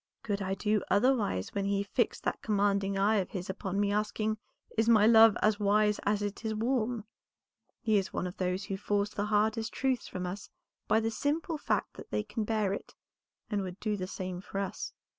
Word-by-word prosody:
"Could 205 Hz, -2 st, -2 dB
I 190 Hz, 0 st, -1 dB
do 210 Hz, +1 st, +1 dB
otherwise 205 Hz, -, +2 dB
when 200 Hz, -1 st, -1 dB
he 200 Hz, 0 st, +1 dB
fixed 200 Hz, -, -1 dB
that -, -, -2 dB
commanding 200 Hz, -2 st, +1 dB
eye 210 Hz, +3 st, +3 dB
of 190 Hz, -, -1 dB
his 185 Hz, -1 st, -4 dB
upon 195 Hz, 0 st, -3 dB
me 205 Hz, 0 st, +2 dB
asking, 215 Hz, +1 st, -1 dB, 0.4 s
'Is 225 Hz, +1 st, +2 dB
my 215 Hz, -2 st, +6 dB
love 225 Hz, -1 st, +7 dB
as 215 Hz, 0 st, +3 dB
wise 210 Hz, +1 st, +3 dB
as 205 Hz, 0 st, +1 dB
it 205 Hz, +2 st, -4 dB
is 220 Hz, -1 st, -1 dB
warm?' 235 Hz, -1 st, 0 dB, 0.8 s
He 215 Hz, -4 st, +3 dB
is 190 Hz, -, -4 dB
one -, -, -2 dB
of 180 Hz, -, -6 dB
those 185 Hz, +1 st, -1 dB
who 195 Hz, 0 st, -4 dB
force 205 Hz, +1 st, 0 dB
the 205 Hz, -, -1 dB
hardest 220 Hz, +1 st, +1 dB
truths 260 Hz, -3 st, 0 dB
from 180 Hz, -1 st, -4 dB
us 190 Hz, +3 st, -6 dB, 0.4 s
by 220 Hz, +1 st, +3 dB
the 225 Hz, 0 st, 0 dB
simple 305 Hz, +6 st, -1 dB
fact -, -, -1 dB
that -, -, -10 dB
they 210 Hz, -, -1 dB
can 215 Hz, 0 st, -3 dB
bear 215 Hz, -3 st, +1 dB
it, -, -, -7 dB, 0.6 s
and 205 Hz, -1 st, +1 dB
would 185 Hz, 0 st, -6 dB
do 215 Hz, -1 st, -1 dB
the 185 Hz, -2 st, -4 dB
same 185 Hz, -1 st, -5 dB
for 195 Hz, 0 st, -7 dB
us. 195 Hz, -1 st, -3 dB
205 Hz, 205 wpm, -31 LUFS, 195-220 Hz, 0.8 s, love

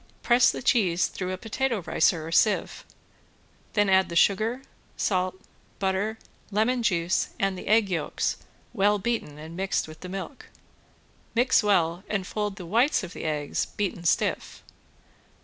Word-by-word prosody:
Press 240 Hz, 0 st, +5 dB
the -, -, -4 dB
cheese 180 Hz, -9 st, +3 dB
through 185 Hz, -1 st, -4 dB
a 185 Hz, -, -3 dB
potato 225 Hz, 0 st, -2 dB
ricer 165 Hz, -1 st, +1 dB
or 165 Hz, -, -6 dB
sieve, 195 Hz, +5 st, +2 dB, 0.9 s
then 205 Hz, -2 st, +3 dB
add 190 Hz, 0 st, +4 dB
the 170 Hz, -, -5 dB
sugar, 220 Hz, +8 st, +2 dB, 0.3 s
salt, 185 Hz, -2 st, 0 dB, 0.4 s
butter, 195 Hz, +3 st, -1 dB, 0.3 s
lemon 220 Hz, +5 st, +1 dB
juice, 175 Hz, -5 st, +1 dB
and 195 Hz, -1 st, +1 dB
the 180 Hz, -, -9 dB
egg 220 Hz, 0 st, +4 dB
yolks 170 Hz, -5 st, -1 dB, 0.4 s
well 205 Hz, -1 st, +3 dB
beaten 205 Hz, -8 st, -3 dB
and 160 Hz, +2 st, -9 dB
mixed 190 Hz, -2 st, -1 dB
with 155 Hz, 0 st, -12 dB
the 180 Hz, -, -8 dB
milk. 195 Hz, +8 st, -7 dB, 0.9 s
Mix 245 Hz, +2 st, +4 dB
well 180 Hz, -4 st, +1 dB
and 200 Hz, -3 st, -1 dB
fold 210 Hz, 0 st, -3 dB
the 185 Hz, -4 st, -8 dB
whites 235 Hz, -, +2 dB
of 180 Hz, -1 st, -7 dB
the -, -, -7 dB
eggs 150 Hz, -2 st, -1 dB
beaten 190 Hz, -4 st, -3 dB
stiff. 170 Hz, -, 0 dB
195 Hz, 150 wpm, -26 LUFS, 175-220 Hz, 0.9 s, Press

